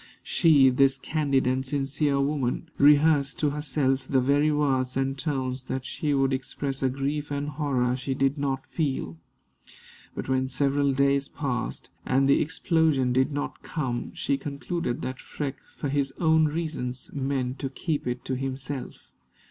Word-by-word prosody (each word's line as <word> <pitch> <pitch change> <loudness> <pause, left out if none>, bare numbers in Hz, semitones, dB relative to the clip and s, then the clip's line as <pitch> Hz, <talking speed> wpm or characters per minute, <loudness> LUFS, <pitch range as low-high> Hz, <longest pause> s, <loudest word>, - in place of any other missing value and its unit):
She, 150 -6 +5
this 135 +1 +4
candid 140 -1 0
and 130 +1 +1
sincere 140 +1 0
woman, 140 +1 -1
rehearsed 145 -1 +5
to 150 -2 +1
herself 135 -2 0
the 135 - +3
very 145 +4 +3
words 135 -4 +1
and 135 0 0
tones 130 -3 -2
that 130 -1 -4
she 150 -4 -2
would 135 0 +2
express 135 +1 -3
a 135 - +2
grief 140 +3 -2
and 145 0 -2
horror 130 -4 0
she 130 +1 -3
did 135 +1 +1
not 135 -2 -2
feel. 135 - -2 1.0
But - - -5
when 130 0 +1
several 140 +1 +1
days 140 +1 +2
passed, 125 -6 -4
and 135 +1 +2
the 140 - +4
explosion 155 -5 +1
did 130 +3 +2
not 145 0 -4
come, 130 -7 -3
she 140 - 0
concluded 140 -1 -3
that 130 0 -4
Freke, 140 -2 -5
for - - -5
his 140 -1 0
own 160 -2 +4
reasons, 150 -5 -3
meant 135 -2 -2
to 135 - -2
keep 145 +1 -3
it 125 0 -3
to 130 - -1
himself. 135 0 -5
135 Hz, 155 wpm, -26 LUFS, 130-145 Hz, 1.0 s, She